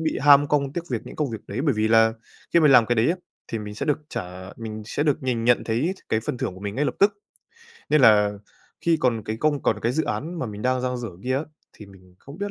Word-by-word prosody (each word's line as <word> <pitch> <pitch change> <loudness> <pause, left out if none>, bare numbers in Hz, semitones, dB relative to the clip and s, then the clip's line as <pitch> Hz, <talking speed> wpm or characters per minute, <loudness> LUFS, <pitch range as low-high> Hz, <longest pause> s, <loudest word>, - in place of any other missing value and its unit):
bị 160 -1 -1
ham 145 0 +7
công 140 -2 +1
tiếc 170 +2 -4
việc 120 -3 -1
những - - -10
công 150 -4 -1
việc 110 - -5
đấy, 105 +5 -4
bởi 140 - +2
vì 110 0 +1
là 110 0 +5 0.4
khi 170 - +5
mình 150 -3 +5
làm 120 -3 +7
cái 120 - +1
đấy 115 +2 +3
á 175 - -1 0.4
thì 115 - -1
mình 105 -1 -7
sẽ - - -4
được 150 - +1
trả, 90 -2 -7
mình 110 -1 -7
sẽ 140 - -2
được 145 -3 0
nhìn 120 -3 -1
nhận 120 0 +3
thấy 125 +11 0
th - - -19
cái 110 - +1
phần 115 - -4
thưởng 125 -8 -3
của 95 - -12
mình 100 0 -5
ngay 145 +3 0
lập - - -1
tức. 200 +1 +5 0.8
Nên 155 - +5
là 105 -4 +6 0.5
khi 170 -1 +2
còn 115 -4 +1
cái 110 - -3
công 145 +2 0
còn 110 - +1
cái 120 +2 +1
dự 160 - 0
án 170 +3 -4
mà 130 - -2
mình 105 -1 -7
đang 130 0 +1
dang 125 0 -2
dở 120 - -5
kia 130 +1 0
á, 140 - -1 0.3
thì 105 - -13
mình 95 -2 -18
không 140 +5 -13
biết 205 +1 -3
125 Hz, 285 wpm, -24 LUFS, 110-145 Hz, 0.8 s, ham